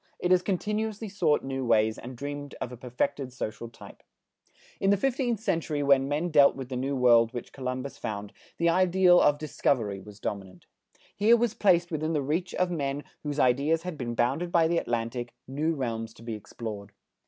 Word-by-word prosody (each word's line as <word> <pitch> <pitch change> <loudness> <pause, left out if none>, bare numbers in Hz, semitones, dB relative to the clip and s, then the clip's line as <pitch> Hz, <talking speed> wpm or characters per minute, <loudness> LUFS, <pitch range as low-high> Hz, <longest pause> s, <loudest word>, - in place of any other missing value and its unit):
It 180 - -1
has 180 -1 +5
continuously 210 +3 -2
sought 170 -7 +1
new 135 0 -3
ways 110 -2 +2
and 125 0 -9
dreamed 145 +1 -6
of 125 - -4
a - - -7
perfected 130 +2 -3
social 115 -1 -5
type. 115 - -14 0.8
In 195 - +2
the 200 - +4
fifteenth 245 -1 0
century 165 -8 -1
when 135 -1 +4
men 150 +5 -1
dealt 145 -2 +6
with 130 -2 -7
the 130 - -4
New 135 +3 -1
World 120 -2 +5
which 120 - -7
Columbus 130 +1 -5
found, 105 -1 -5 0.2
the 170 - +1
ideal 180 +1 +5
of 145 - +4
discovery 120 -9 -1
was 105 +2 -13
dominant. 95 -3 -6 0.5
Here 225 +4 +5
was 235 -2 0
placed 175 -4 +3
within 155 +1 -1
the 150 -3 0
reach 170 +6 -2
of 180 -1 +1
men 145 -3 -2 0.2
whose 145 -1 -3
ideas 145 +6 +2
had 180 -2 -5
been 120 -4 -4
bounded 135 +10 0
by 165 -2 +4
the 170 0 +2
Atlantic, 120 +1 -3
new 155 +5 -1
realms 115 -4 -4
to - - -15
be 115 -1 -4
explored. 105 -1 -7
140 Hz, 190 wpm, -28 LUFS, 120-175 Hz, 0.8 s, dealt